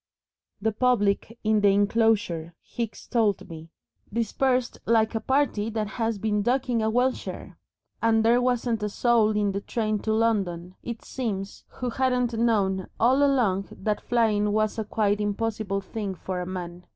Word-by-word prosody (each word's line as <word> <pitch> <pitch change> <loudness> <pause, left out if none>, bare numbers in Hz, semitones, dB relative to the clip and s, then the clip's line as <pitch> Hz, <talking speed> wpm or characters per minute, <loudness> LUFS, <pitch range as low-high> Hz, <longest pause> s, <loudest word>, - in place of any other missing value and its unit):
The 220 +2 0
public 220 -1 +1
in 215 -1 +2
the 205 - +5
enclosure, 200 -5 +2
Hicks 235 -3 -6
told 220 -6 +1
me, 165 -1 -10 0.4
dispersed 250 +3 0
"like 225 0 +3
a 225 - 0
party 260 -5 +1
that 220 -1 -2
has 225 -1 -2
been 210 0 0
ducking 245 0 +1
a 220 - +1
welsher," 250 +3 -2 0.4
and 225 -1 +3
there 240 +2 +4
wasn't 245 -2 0
a 210 - -1
soul 230 0 +3
in 205 -1 +1
the 200 +1 -3
train 215 -1 -1
to 220 - -2
London, 195 -6 0
it 235 -1 -7
seems, 200 -6 -4
who 250 -1 -5
hadn't 250 -1 +1
known 205 -5 +1
all 260 +5 +4
along 230 -9 +2
that 210 +1 -2
flying 215 -3 +1
was 215 +1 0
a - - 0
quite 210 -1 0
impossible 205 -1 -2
thing 195 0 -5
for 180 +1 -4
man. 180 -1 -6
220 Hz, 155 wpm, -26 LUFS, 200-235 Hz, 0.4 s, the